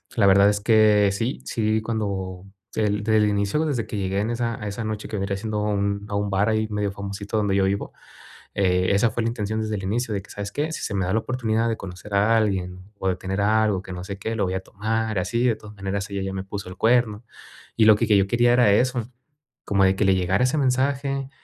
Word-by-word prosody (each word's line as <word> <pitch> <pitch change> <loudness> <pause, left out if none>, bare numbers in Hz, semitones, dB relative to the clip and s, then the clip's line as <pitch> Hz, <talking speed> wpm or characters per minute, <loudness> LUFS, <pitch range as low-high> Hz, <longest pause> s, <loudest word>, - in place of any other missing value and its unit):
la 110 - +3
verdad 100 +1 +6
es 105 0 0
que 105 -2 +5
sí, 115 +7 -2
sí 110 -1 0
cuando 100 -4 -3 0.3
del 105 -1 0
desde 110 0 +3
el 105 0 +3
inicio, 100 +10 0
desde 130 -7 -2
que 105 - -5
llegué 95 0 -1
en 110 - -1
esa 115 -1 -2
a 105 - -4
esa 100 +3 -4
noche 110 -1 -4
que 105 - -4
venía 100 0 -2
haciendo 105 +1 -3
un 100 -1 -1
a 100 - -3
un 100 0 -1
bar 100 +3 +1
ahí 110 0 +1
medio 105 -1 -1
famosito 100 +1 -6
donde 100 -2 +1
yo 100 - +3
vivo, 100 +1 -2 0.6
eh, 90 -1 +2
esa 105 +3 +3
fue 115 +2 -2
la - - +1
intención 110 -1 -3
desde 110 0 -2
el 95 - -5
inicio, 110 +2 -1
de 100 - -3
que: - - -19
"¿Sabes 100 0 -6
qué? 150 +2 -2
Si - - -5
se - - -3
me 95 -2 0
da 95 - -1
la - - +3
oportunidad 115 -2 -1
de 115 - -1
conocer 95 +2 -8
a 110 +3 +4
alguien, 95 -4 0 0.2
o 95 - -1
de 90 - 0
tener 95 +2 -3
a 110 +2 +3
algo, 95 -3 0
que 95 - -9
no 90 0 -6
sé 100 +1 -6
qué, 110 +3 -3
lo 105 - +1
voy 90 - -2
a 95 - -1
tomar, 110 +2 -2
así, 115 +7 0
de 115 -3 +2
todas 105 -1 -13
maneras 100 +1 -3
ella 100 -1 -3
ya 95 0 -3
me 95 0 -4
puso 100 -1 -6
el 90 - -9
cuerno". 115 -1 +2 0.5
Y 110 - +4
lo 110 -1 +8
que - - 0
que 105 - +5
yo 95 -1 +3
quería 120 +2 +3
era 120 -4 +5
eso, 125 +2 +1 0.5
como 100 -1 +2
de 95 0 +3
que 105 - +1
le 95 - +4
llegara 95 +6 +1
ese 130 +4 +1
mensaje, 135 +1 0
105 Hz, 260 wpm, -24 LUFS, 100-110 Hz, 0.6 s, lo